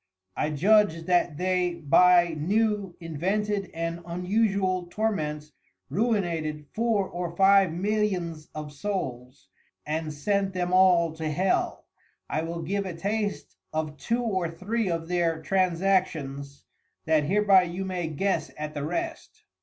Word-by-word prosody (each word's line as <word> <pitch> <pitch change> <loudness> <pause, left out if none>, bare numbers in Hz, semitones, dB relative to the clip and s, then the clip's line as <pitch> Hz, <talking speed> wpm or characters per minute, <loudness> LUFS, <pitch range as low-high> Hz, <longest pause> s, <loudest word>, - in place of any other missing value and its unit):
I 150 - 0
judge 180 +2 +3
that 175 -4 +2
they 180 -1 0
by 175 +2 +5
new 200 +3 0
invented 195 +5 -2
and 165 +1 -4
unusual 185 +1 0
Torments 155 -7 -2 0.4
ruinated 170 -9 -1
four 220 -4 +1
or 175 -1 -5
five 195 -1 +5
Millions 180 -4 -1
of 150 -1 -6
Souls 130 - -5 0.4
and 155 +1 -2
sent 195 +6 -1
them 180 0 -1
all 180 -3 +5
to 160 -1 -4
Hell. 185 +6 0 0.4
I 155 - -1
will 165 +1 -4
give 200 +4 -2
a 175 - -5
taste 205 +3 -3 0.2
of 155 -1 -3
two 235 - -1
or 190 -7 -1
three 195 +6 -2
of 165 -1 -2
their 170 -2 0
Transactions, 165 -6 0 0.4
that 155 -2 +3
hereby 195 +2 +5
you 180 +2 -4
may 180 -3 -2
guess 160 +1 -1
at 150 0 -5
the 145 -2 -4
rest. 330 - -4
175 Hz, 130 wpm, -26 LUFS, 160-195 Hz, 0.4 s, by